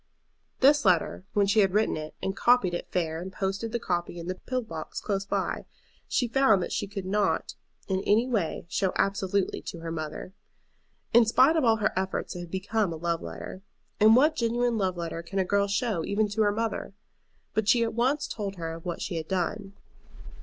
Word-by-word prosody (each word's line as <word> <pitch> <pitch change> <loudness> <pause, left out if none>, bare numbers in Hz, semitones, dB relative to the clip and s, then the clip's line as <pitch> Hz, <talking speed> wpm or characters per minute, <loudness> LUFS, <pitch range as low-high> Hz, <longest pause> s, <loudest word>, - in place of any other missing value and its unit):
This 285 +2 +6
letter, 185 -1 +2
when 205 -1 +3
she 200 +2 +3
had 195 -2 +3
written 215 +1 +2
it 155 0 -6
and 190 - -1
copied 240 -7 +3
it 175 - -4
fair 165 -2 -1
and 190 +2 -6
posted 195 +4 -3
the 235 - 0
copy 175 -5 -2
in 170 - -6
the 185 - -2
pillar 255 +7 -3
box 160 -7 -6
close 195 -2 -2
by, - - -2 0.4
she 245 - +1
found 230 -6 +4
that - - -5
she 205 - -2
could 195 -1 -6
not 205 +2 0 0.3
in 190 -1 0
any 220 +6 +3
way 205 -12 -1
show 185 +2 0
absolutely 195 0 0
to 170 - -7
her 165 0 -5
mother. 155 +3 -5 0.8
In 235 +1 +8
spite 260 +7 +4
of 320 - +2
all 225 -2 +5
her 215 -1 0
efforts 190 0 -2
it - - -5
had 175 -1 -7
become 195 +2 -1
a - - -4
love 170 +1 -2
letter. 85 - -7 0.4
And 220 +2 +7
what 300 +5 +4
genuine 240 -1 +1
love 190 -4 0
letter 165 -1 -4
can 170 +4 -7
a 190 - +2
girl 200 +1 +2
show 205 -3 0
even 210 +4 +1
to 220 +2 -1
her 205 -1 +4
mother? 220 -2 -3 0.6
But 220 -1 0
she 235 0 +5
at 230 - -2
once 260 +6 +1
told 200 -3 -4
her 165 -2 -4
of 165 0 -10
what 175 - -3
she 175 - -3
had 160 -1 -4
done. 195 +2 -2
195 Hz, 210 wpm, -27 LUFS, 175-225 Hz, 0.8 s, In